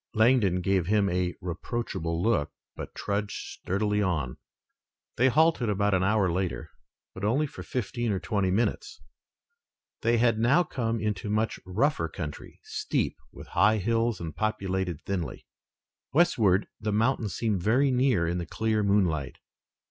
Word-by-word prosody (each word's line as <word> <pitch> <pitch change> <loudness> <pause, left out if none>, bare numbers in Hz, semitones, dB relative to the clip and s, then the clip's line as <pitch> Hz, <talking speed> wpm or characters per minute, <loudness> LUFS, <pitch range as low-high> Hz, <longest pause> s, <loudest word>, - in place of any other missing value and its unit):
Langdon 110 -5 +4
gave 95 -2 +1
him 105 0 +3
a 90 0 -1
reproachful 85 -2 -3
look, 110 -10 +2 0.3
but - - -8
trudged 100 0 -2 0.2
sturdily 105 +2 0
on. 80 -10 -1 0.8
They 130 - +4
halted 150 -3 +3
about 100 0 +1
an 95 - +3
hour 100 -2 +2
later, 85 -3 -3 0.4
but 95 - -9
only 130 +9 +2
for 145 - -9
fifteen 120 -1 -2
or 95 - 0
twenty 100 -2 0
minutes. 105 +6 -1 1.0
They 115 +1 +3
had 115 -1 +3
now 140 +10 +4
come 115 -7 -2
into 105 -1 -2
much 110 +1 0
rougher 95 - +1
country, 75 -3 -7
steep, - - -2 0.2
with - - -12
high 105 +2 +4
hills 115 +1 0
and 80 -3 -6
populated 95 -4 -2
thinly. 90 -5 -4 0.7
Westward, 115 - +3
the 105 0 -2
mountains 110 -1 +1
seemed 105 -6 0
very 130 +8 +3
near 125 -8 +2
in 85 +1 -1
the 85 - -5
clear 110 -1 0
moonlight. 95 -8 +1
105 Hz, 145 wpm, -27 LUFS, 90-115 Hz, 1.0 s, Langdon